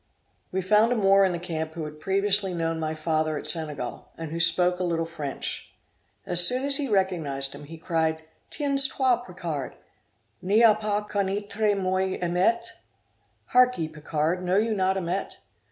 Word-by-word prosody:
We 190 Hz, 0 st, -2 dB
found 210 Hz, +5 st, +3 dB
a -, -, +2 dB
Moor 195 Hz, -2 st, +4 dB
in 190 Hz, -, +1 dB
the 175 Hz, -, -3 dB
camp 160 Hz, -2 st, -5 dB
who 165 Hz, -2 st, -4 dB
had 150 Hz, 0 st, -10 dB
previously 195 Hz, +1 st, +1 dB
known 165 Hz, -1 st, -2 dB
my 155 Hz, 0 st, -3 dB
father 155 Hz, -1 st, -1 dB
at -, -, -7 dB
Senegal, 150 Hz, -4 st, -1 dB
and 165 Hz, -2 st, -7 dB
who 165 Hz, -, -4 dB
spoke 175 Hz, +2 st, +3 dB
a -, -, -1 dB
little 165 Hz, -2 st, -1 dB
French. 150 Hz, -4 st, -5 dB, 0.5 s
As 175 Hz, 0 st, +4 dB
soon 255 Hz, +8 st, +5 dB
as 280 Hz, -1 st, +5 dB
he 285 Hz, -, -1 dB
recognised 165 Hz, -9 st, -1 dB
him, 145 Hz, +1 st, -10 dB
he 165 Hz, +3 st, -10 dB
cried, 160 Hz, -1 st, -1 dB, 0.3 s
'Tiens 280 Hz, -2 st, +3 dB
toi 260 Hz, -3 st, +1 dB
Picard! 175 Hz, -, -6 dB, 0.7 s
ni 205 Hz, +5 st, +3 dB
a 225 Hz, -2 st, +7 dB
pas 210 Hz, -1 st, -2 dB
conneitre 205 Hz, +1 st, -1 dB
moi 185 Hz, 0 st, -1 dB
Amet?' 185 Hz, +7 st, 0 dB, 0.8 s
Hark 250 Hz, 0 st, +4 dB
ye, 160 Hz, -, -2 dB
Picard, 155 Hz, +3 st, -2 dB
know 180 Hz, +2 st, +1 dB
you 220 Hz, +1 st, +1 dB
not 190 Hz, -1 st, 0 dB
Amet? 185 Hz, +1 st, -3 dB
180 Hz, 170 wpm, -25 LUFS, 160-205 Hz, 0.8 s, a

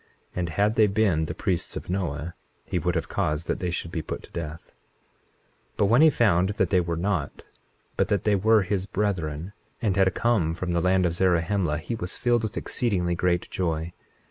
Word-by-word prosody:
And 90 Hz, -2 st, -1 dB
had 105 Hz, +7 st, +1 dB
they 110 Hz, -1 st, +6 dB
been 100 Hz, -6 st, +2 dB
the -, -, -5 dB
priests 90 Hz, -2 st, -2 dB
of -, -, -7 dB
Noah 85 Hz, -3 st, -3 dB, 0.3 s
he -, -, -1 dB
would -, -, -1 dB
have -, -, -1 dB
caused 75 Hz, +2 st, -1 dB
that -, -, -2 dB
they 90 Hz, -, -2 dB
should 85 Hz, -1 st, -3 dB
be 80 Hz, -, -2 dB
put -, -, -6 dB
to -, -, -15 dB
death. 80 Hz, -1 st, -7 dB, 1.0 s
21:24 -, -, -38 dB
But -, -, +3 dB
when 115 Hz, +7 st, +5 dB
he 160 Hz, -, +8 dB
found 100 Hz, -, +3 dB
that -, -, +1 dB
they 95 Hz, -, +4 dB
were 85 Hz, -1 st, -2 dB
not, 90 Hz, -5 st, -2 dB, 0.5 s
but -, -, +2 dB
that 100 Hz, -, 0 dB
they 105 Hz, -, +2 dB
were 105 Hz, +2 st, +4 dB
his 95 Hz, 0 st, -2 dB
brethren, 90 Hz, -4 st, -2 dB, 0.3 s
and 105 Hz, -6 st, 0 dB
had 95 Hz, -1 st, +4 dB
come 100 Hz, -9 st, +1 dB
from 90 Hz, +1 st, -3 dB
the 85 Hz, 0 st, +1 dB
land 90 Hz, +1 st, +3 dB
of 85 Hz, -, +1 dB
Zarahemla, 85 Hz, -2 st, +1 dB
he 85 Hz, +8 st, -5 dB
was 90 Hz, -5 st, -4 dB
filled 120 Hz, -1 st, +2 dB
with 110 Hz, -, -4 dB
exceedingly 95 Hz, -9 st, 0 dB
great 85 Hz, 0 st, 0 dB
joy. 85 Hz, -1 st, -2 dB
90 Hz, 205 wpm, -26 LUFS, 85-105 Hz, 1.0 s, he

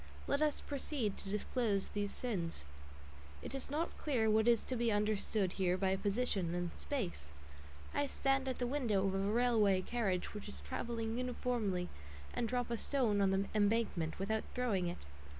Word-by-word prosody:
Let 280 Hz, +1 st, +1 dB
us 300 Hz, -1 st, +2 dB
proceed 270 Hz, -7 st, -2 dB
to 195 Hz, -, -6 dB
disclose 210 Hz, 0 st, 0 dB
these 205 Hz, -1 st, -2 dB
sins. 175 Hz, -, -3 dB, 0.8 s
It -, -, -5 dB
is 270 Hz, 0 st, -3 dB
not 310 Hz, +4 st, -1 dB
clear 235 Hz, -7 st, +2 dB
what 220 Hz, +1 st, +4 dB
is 235 Hz, -2 st, +5 dB
to 255 Hz, -, -2 dB
be 235 Hz, -1 st, +2 dB
understood 205 Hz, -2 st, +1 dB
here 180 Hz, 0 st, +3 dB
by 190 Hz, 0 st, +2 dB
"position" 195 Hz, -3 st, 0 dB
and 175 Hz, -1 st, -1 dB
"space." 190 Hz, -, -3 dB, 0.7 s
I 285 Hz, -, +1 dB
stand 270 Hz, 0 st, +1 dB
at 260 Hz, -, -1 dB
the 245 Hz, -, 0 dB
window 240 Hz, -7 st, +1 dB
of 195 Hz, -, +1 dB
a 195 Hz, -, +1 dB
railway 210 Hz, -2 st, +3 dB
carriage 195 Hz, -7 st, -1 dB
which 210 Hz, -, -6 dB
is 65 Hz, -, -5 dB
travelling 225 Hz, -, -3 dB
uniformly, 235 Hz, -7 st, -1 dB, 0.5 s
and 235 Hz, -, 0 dB
drop 245 Hz, -1 st, -1 dB
a 235 Hz, -, +1 dB
stone 225 Hz, -6 st, +1 dB
on 195 Hz, -, +4 dB
the 195 Hz, +1 st, +2 dB
embankment, 205 Hz, -6 st, +1 dB
without 215 Hz, +3 st, 0 dB
throwing 210 Hz, -8 st, +1 dB
it. 175 Hz, -, -5 dB
215 Hz, 170 wpm, -36 LUFS, 195-245 Hz, 0.8 s, is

